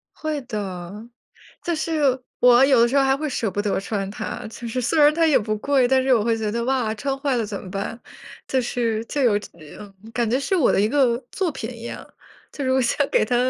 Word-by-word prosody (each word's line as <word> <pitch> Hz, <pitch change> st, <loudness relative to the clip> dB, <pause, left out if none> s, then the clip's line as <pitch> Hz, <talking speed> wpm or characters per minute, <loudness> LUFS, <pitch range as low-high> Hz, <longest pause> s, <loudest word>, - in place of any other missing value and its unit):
会 310 Hz, -2 st, -3 dB
的， 195 Hz, -7 st, -5 dB, 0.7 s
就 345 Hz, -, -1 dB
是 305 Hz, -5 st, 0 dB, 0.2 s
我 245 Hz, +1 st, +7 dB
有 270 Hz, -3 st, +5 dB
的 235 Hz, -, +5 dB
时 265 Hz, -, 0 dB
候 275 Hz, -, +5 dB
还 270 Hz, 0 st, +3 dB
会 305 Hz, +2 st, -3 dB
舍 230 Hz, -5 st, -2 dB
不 205 Hz, -, -2 dB
得 205 Hz, -1 st, 0 dB
穿 195 Hz, -1 st, -3 dB
它， 205 Hz, -, -6 dB
就 235 Hz, +2 st, -9 dB
是 235 Hz, +2 st, -2 dB
虽 250 Hz, +6 st, 0 dB
然 295 Hz, 0 st, +6 dB
它 330 Hz, 0 st, +3 dB
也 305 Hz, -, +5 dB
不 215 Hz, 0 st, -2 dB
贵， 270 Hz, +2 st, +2 dB
但 260 Hz, +1 st, +3 dB
是 260 Hz, 0 st, +3 dB
我 220 Hz, -3 st, +1 dB
会 230 Hz, 0 st, +1 dB
觉 220 Hz, -1 st, -2 dB
得， 235 Hz, +2 st, -2 dB
哇， 250 Hz, -4 st, 0 dB
穿 270 Hz, +5 st, -3 dB
坏 270 Hz, -2 st, 0 dB
了 230 Hz, -, 0 dB
怎 205 Hz, -1 st, -5 dB
么 185 Hz, -, -9 dB
办？ 200 Hz, +4 st, -4 dB, 0.5 s
就 260 Hz, -, +1 dB
是 230 Hz, -2 st, -1 dB
就 285 Hz, -, -2 dB
有 220 Hz, -5 st, +3 dB
这 210 Hz, -, -11 dB, 0.3 s
嗯， 205 Hz, -1 st, -11 dB, 0.2 s
感 235 Hz, 0 st, 0 dB
觉 250 Hz, -, +2 dB
是 280 Hz, +7 st, -1 dB
我 315 Hz, -, +3 dB
的 -, -, +2 dB
一 210 Hz, -, +2 dB
个 255 Hz, -2 st, +3 dB
作 375 Hz, -3 st, -1 dB
品 235 Hz, -4 st, -6 dB
一 235 Hz, -2 st, -10 dB
样， -, -, -7 dB, 0.5 s
就 285 Hz, -, -5 dB
是 260 Hz, -, 0 dB
我 265 Hz, -, +3 dB
想 260 Hz, +3 st, +1 dB
给 -, -, +3 dB
它 245 Hz, +3 st, 0 dB
245 Hz, 265 characters per minute, -22 LUFS, 220-275 Hz, 0.7 s, 我